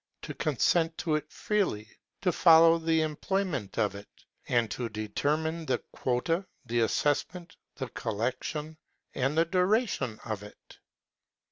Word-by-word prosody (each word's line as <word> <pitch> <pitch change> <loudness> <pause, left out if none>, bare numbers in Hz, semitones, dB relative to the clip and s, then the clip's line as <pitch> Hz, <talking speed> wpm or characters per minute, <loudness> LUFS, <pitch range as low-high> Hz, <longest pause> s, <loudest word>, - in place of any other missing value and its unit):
to - - -5
consent 165 -1 +1
to 160 - -1
it 155 - -2
freely, 185 - -1 0.3
to 180 - +2
follow 165 -1 +6
the 160 -1 +2
employment 155 - -2
of 105 -2 +1
it, 100 0 -10 0.4
and 120 -3 +1
to 120 0 -3
determine 150 +10 -1
the 130 - +2
quota, 150 +9 0 0.2
the 120 0 0
assessment, 145 +9 0 0.2
the 130 - -4
collection, 130 +8 -3 0.4
and 135 +4 0
the 165 - +5
duration 185 - +1
of 110 -3 -3
it. 105 0 -14
150 Hz, 130 wpm, -29 LUFS, 115-165 Hz, 0.4 s, follow